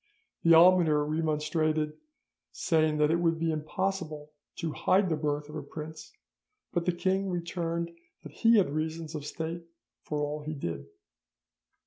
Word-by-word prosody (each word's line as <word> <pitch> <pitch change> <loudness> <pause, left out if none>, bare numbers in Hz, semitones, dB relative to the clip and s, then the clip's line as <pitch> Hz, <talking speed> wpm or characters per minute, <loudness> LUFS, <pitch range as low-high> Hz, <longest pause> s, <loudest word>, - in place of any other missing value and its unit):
The 165 0 +6
almoner 165 -3 +6
remonstrated, 155 0 0 0.6
saying 155 -2 +1
it 155 +3 +3
would 165 -1 +2
be 165 0 0
impossible 155 -1 -3 0.2
to 165 - -3
hide 190 0 +2
the 160 - +1
birth 150 -1 -2
of 150 - -11
a 155 - -3
prince, 155 +2 -8 0.6
but 175 -1 -1
the - - +5
king 190 +2 0
returned 170 -1 -3 0.3
that - - -9
he 230 -1 +4
had 190 -8 +3
reasons 160 +1 -3
of 150 -2 -5
state 165 +2 -4 0.4
for 150 - -4
all 150 +1 -2
he 155 +1 -5
did. 85 - -5
160 Hz, 145 wpm, -29 LUFS, 150-170 Hz, 0.6 s, The